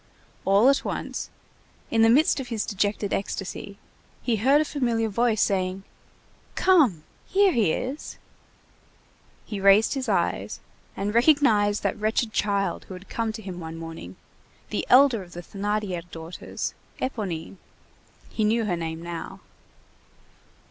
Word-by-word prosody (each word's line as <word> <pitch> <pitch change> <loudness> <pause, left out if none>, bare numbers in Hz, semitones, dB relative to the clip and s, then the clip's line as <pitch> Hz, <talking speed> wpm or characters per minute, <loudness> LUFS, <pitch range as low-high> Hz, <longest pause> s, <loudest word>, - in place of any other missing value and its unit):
All 200 +5 +5
at 275 0 +4
once, - - -4 0.6
in 225 - +3
the 225 - +6
midst 295 +7 +4
of 265 - -5
his 230 -3 -2
dejected 205 0 -1
ecstasy, 200 0 -4 0.5
he 235 -3 +1
heard 270 +7 +4
a 310 - +2
familiar 235 -6 0
voice 225 +1 +2
saying:— 190 -1 -1 0.7
"Come! 280 - +4 0.2
Here 395 0 +4
he 220 - +2
is!" 265 - -4 1.3
He 205 - -5
raised 200 +3 +5
his 270 -2 -3
eyes, - - 0 0.4
and 205 +1 -2
recognized 230 -6 +4
that - - -1
wretched 220 +1 0
child 200 -2 0
who 190 - -8
had 185 +2 -13
come 225 -1 -1
to 220 - -8
him 185 -2 -6
one 165 -1 -7
morning, 165 - -8 0.6
the - - -2
elder 260 -4 +6
of 175 -2 -12
the 175 - -6
Thénardier 200 -3 -3
daughters, 165 +1 -6 0.3
Éponine; 195 -9 -4 0.7
he 220 - -1
knew 225 +2 +2
her 185 -4 0
name 165 -1 -5
now. 170 -1 -6
210 Hz, 140 wpm, -25 LUFS, 185-240 Hz, 1.3 s, the